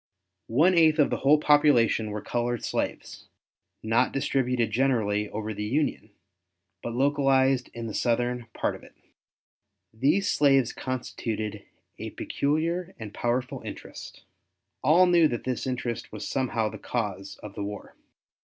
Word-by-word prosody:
One 155 +11 +4
eighth 160 -2 +5
of 150 - +3
the - - 0
whole 145 +3 +5
population 145 -7 +4
were 105 0 -5
colored 120 -1 -2
slaves, - - -4 0.6
not 115 +3 +2
distributed 125 -4 0
generally 105 -4 +1
over 110 0 -4
the 105 - -5
Union, 130 -1 -1 0.7
but 120 0 -5
localized 135 -1 +2
in 115 0 -5
the 110 - -5
southern 120 +1 0
part - - -1
of - - -10
it. - - -17 1.0
These 150 - +2
slaves 135 -4 +3
constituted 110 -5 -4 0.3
a - - -5
peculiar 165 +5 -2
and 110 -3 -8
powerful 125 +1 -2
interest. - - -9 0.6
All 160 +7 +5
knew 175 -3 +5
that 120 -5 -4
this 130 0 -3
interest 125 -2 -3
was - - -6
somehow 120 -4 0
the - - -9
cause 100 -4 -4
of 105 -2 -8
the 100 - -5
war. 105 0 -7
125 Hz, 140 wpm, -27 LUFS, 110-145 Hz, 1.0 s, eighth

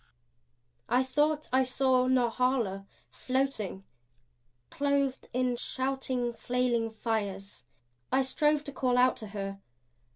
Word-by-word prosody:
I 250 +1 +3
thought 295 +3 +1
I 260 - +5
saw 255 0 +2
Norhala 245 -5 +1 0.2
floating, 255 -7 -2 0.9
clothed 280 -2 0
in 250 -1 0
shouting, 260 -2 -1
flailing 240 -1 0
fires. 205 - -4 0.5
I 270 - +3
strove 295 +2 +1
to 280 - -6
call 255 -2 +1
out 250 +1 +5
to 215 - -5
her. 195 -1 -5
255 Hz, 105 wpm, -30 LUFS, 225-265 Hz, 0.9 s, I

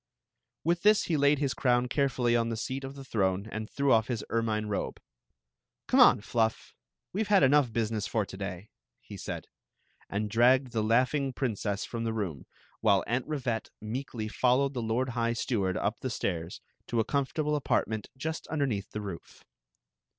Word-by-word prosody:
With 170 +2 +1
this 210 0 +5
he 165 - 0
laid 145 0 +4
his 140 -1 0
crown 125 -2 +2
carefully 125 -3 +1
on 115 -1 +1
the 115 - -3
seat 130 +4 -3
of 135 +1 -6
the 135 -1 -9
throne 100 -4 0
and 110 0 -5
threw 140 -2 +2
off 110 -1 +3
his 120 -4 -3
ermine 110 -2 0
robe. 105 -1 -3 0.9
"Come - - +3
on. - - +7
Fluff! 110 0 -1 0.4
We 200 - 0
Ve 220 - -1
had 200 -7 +5
enough 135 -2 +4
business 110 -2 -1
for 110 -3 0
to 95 - -10
day," 95 0 -6 0.3
he - - -11
said, - - -5 0.6
and 105 +2 -1
dragged 125 +4 +4
the 110 - 0
laughing 130 +5 +2
prin 125 -4 -1
cess 100 0 -2
from 115 -1 -4
the 115 -1 -1
room, 95 -11 -4 0.3
while 100 0 +3
Aunt 125 +3 -1
Rivette 130 -7 -2
meekly 110 0 -4
fol 125 +3 +2
lowed 140 0 +1
the 125 - -2
lord 115 +3 0
high 115 -1 0
steward 100 -6 -1
up 105 +3 -1
the 130 - -3
stairs 85 -7 -3 0.3
to 120 - 0
'a. - - +4
com 140 -2 0
fortable 150 0 -1
apartment 110 -6 -1
just 160 +4 -4
underneath 135 -10 -1
the 105 - -3
roof. 95 -5 -9
115 Hz, 185 wpm, -29 LUFS, 110-135 Hz, 0.9 s, on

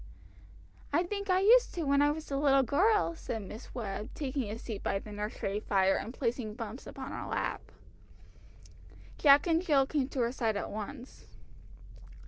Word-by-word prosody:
"I 330 +5 +3
think 400 +2 -4
I 370 0 +4
used 475 +4 +5
to 340 - -2
when 280 -1 +3
I 290 - +4
was 305 0 -4
a - - 0
little 275 -1 +4
girl," 380 - +2
said 225 -9 -5
Miss 215 +6 -10
Webb, 210 -3 -4
taking 265 -5 -3
a 215 - -4
seat 220 -3 -6
by 195 - 0
the 210 +2 -9
nursery 210 -1 -3
fire, 195 -2 +2
and 225 - -4
placing 235 -4 -3
Bumps 230 +2 -7
upon - - -7
her - - -5
lap. - - -2 1.6
Jack 285 -1 +6
and 330 -1 +2
Jill 290 -7 +3
came 275 -1 -1
to 270 - -2
her 235 0 +1
side 225 -5 -1
at - - -4
once. 240 +5 -8
265 Hz, 175 wpm, -31 LUFS, 215-305 Hz, 1.6 s, Jack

